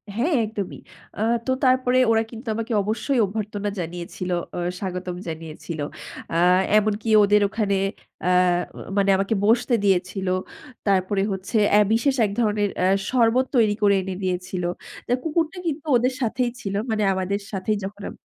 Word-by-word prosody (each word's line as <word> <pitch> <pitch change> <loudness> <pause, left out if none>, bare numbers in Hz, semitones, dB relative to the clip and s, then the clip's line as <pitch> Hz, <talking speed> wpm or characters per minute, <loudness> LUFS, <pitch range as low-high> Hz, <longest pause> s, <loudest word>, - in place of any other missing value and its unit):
হ্যাঁ 280 +10 +1
একদমই। 210 -3 -5 0.4
আ - - -3 0.2
তো 260 - 0
তারপরে 255 -1 +3
ওরা 225 0 +3
কিন্তু 230 0 -10
আমাকে 230 +1 -3
অবশ্যই 230 +5 0
অভ্যর্থনা 205 0 -3
জানিয়েছিল। 175 +1 -5 0.3
অ - - -1 0.2
স্বাগতম 180 -2 -4
জানিয়েছিল। 160 0 -6 0.5
আ - - -1 0.4
এমনকি 215 +1 0
ওদের 205 +1 +4
ওখানে 210 -2 0 0.5
অ্যা 180 - +2 0.7
মানে 200 0 +3
আমাকে 195 +3 0
বসতে 240 +3 +3
দিয়েছিল। 190 0 +1 0.6
তারপরে 195 0 +2
হচ্ছে 190 +4 -2 0.2
অ্যা 210 - +7
বিশেষ 265 +4 +2
এক 205 - -2
ধরনের 210 -3 +1
অ্যা 180 - +3 0.2
শরবত 250 0 +3
তৈরি 215 -4 +4
করে 200 -1 +5
এনে 190 0 -5
দিয়েছিল। 185 0 -2 0.4
তো - - -3
কুকুরটা 325 +2 -1
কিন্তু 310 -1 -3
ওদের 255 +2 +1
সাথেই 245 +1 0
ছিল 195 - -4 0.2
মানে 215 -1 0
আমাদের 190 +2 -1
সাথেই 205 +1 -1
যখন 200 +1 -8
আম - - -10
210 Hz, 150 wpm, -23 LUFS, 190-235 Hz, 0.7 s, অ্যা